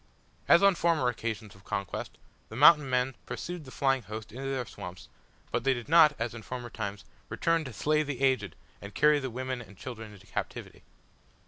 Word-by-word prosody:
As 170 Hz, +3 st, +6 dB
on 200 Hz, 0 st, +7 dB
former 165 Hz, -7 st, +2 dB
occasions 110 Hz, -3 st, -4 dB
of 95 Hz, -, -18 dB
conquest, 100 Hz, -2 st, -4 dB, 0.3 s
the 110 Hz, -, -9 dB
Mountain 150 Hz, +1 st, +7 dB
men 125 Hz, +1 st, +1 dB
pursued 175 Hz, -3 st, -5 dB
the -, -, -10 dB
flying 135 Hz, 0 st, +1 dB
host 105 Hz, 0 st, -8 dB
into 135 Hz, +4 st, -5 dB
their 130 Hz, -2 st, -2 dB
swamps, 90 Hz, -4 st, -9 dB, 0.4 s
but 120 Hz, -, -1 dB
they 135 Hz, 0 st, +3 dB
did 120 Hz, 0 st, -7 dB
not, 155 Hz, -1 st, +7 dB
as 115 Hz, 0 st, -2 dB
in 120 Hz, -, -8 dB
former 120 Hz, +1 st, -6 dB
times, 105 Hz, -2 st, -5 dB, 0.2 s
return 165 Hz, +9 st, +1 dB
to 130 Hz, -, -6 dB
slay 150 Hz, +7 st, +1 dB
the 140 Hz, -4 st, -4 dB
aged 130 Hz, -7 st, +1 dB, 0.3 s
and 100 Hz, +1 st, -9 dB
carry 150 Hz, 0 st, +5 dB
the 135 Hz, -2 st, -4 dB
women 130 Hz, +1 st, -4 dB
and 105 Hz, -4 st, -14 dB
children 110 Hz, -3 st, -8 dB
into 100 Hz, -2 st, -15 dB
captivity. -, -, -6 dB
125 Hz, 195 wpm, -29 LUFS, 110-145 Hz, 0.4 s, on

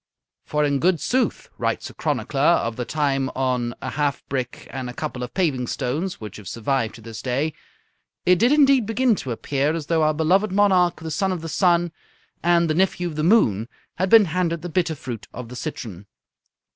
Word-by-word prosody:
"For 150 Hz, 0 st, +1 dB
in 140 Hz, -1 st, +1 dB
good 175 Hz, +2 st, +2 dB
sooth," 255 Hz, -, 0 dB
writes -, -, -2 dB
a -, -, -17 dB
chronicler -, -, -2 dB
of 115 Hz, 0 st, +3 dB
the 125 Hz, -, -3 dB
time 135 Hz, -1 st, 0 dB
on 125 Hz, -2 st, -1 dB
a -, -, -3 dB
half 145 Hz, 0 st, -1 dB
brick 130 Hz, -3 st, -3 dB
and 130 Hz, -2 st, -5 dB
a 125 Hz, -, -8 dB
couple 150 Hz, -5 st, -4 dB
of 125 Hz, -, -6 dB
paving 140 Hz, -10 st, 0 dB
stones 155 Hz, +13 st, -2 dB
which 105 Hz, -3 st, -8 dB
have 105 Hz, -3 st, -11 dB
survived 115 Hz, +1 st, -1 dB
to 115 Hz, -, -13 dB
this 110 Hz, 0 st, -8 dB
day, 135 Hz, +5 st, -1 dB, 0.7 s
"it 180 Hz, -1 st, +5 dB
did 240 Hz, +5 st, +4 dB
indeed 275 Hz, -6 st, +5 dB
begin 235 Hz, +2 st, +2 dB
to 130 Hz, -, -6 dB
appear 140 Hz, +6 st, -1 dB
as 160 Hz, -3 st, -4 dB
though 165 Hz, +1 st, +1 dB
our 155 Hz, 0 st, +2 dB
beloved 185 Hz, +6 st, +2 dB
monarch, 185 Hz, -4 st, +3 dB
the 160 Hz, 0 st, -5 dB
son 190 Hz, +6 st, 0 dB
of 180 Hz, -3 st, -3 dB
the 165 Hz, -, -6 dB
sun 175 Hz, -1 st, +2 dB, 0.5 s
and 170 Hz, 0 st, +3 dB
the 155 Hz, -, +1 dB
nephew 180 Hz, 0 st, +1 dB
of 155 Hz, -, -8 dB
the 155 Hz, -, -1 dB
moon, 120 Hz, -, +3 dB, 0.3 s
had 185 Hz, +2 st, 0 dB
been 225 Hz, -1 st, +8 dB
handed 170 Hz, -1 st, -1 dB
the 175 Hz, -, -4 dB
bitter 170 Hz, -1 st, 0 dB
fruit 120 Hz, -8 st, -7 dB
of 125 Hz, -1 st, -7 dB
the 125 Hz, -, -8 dB
citron." 110 Hz, -, -6 dB
155 Hz, 205 wpm, -23 LUFS, 125-180 Hz, 0.7 s, been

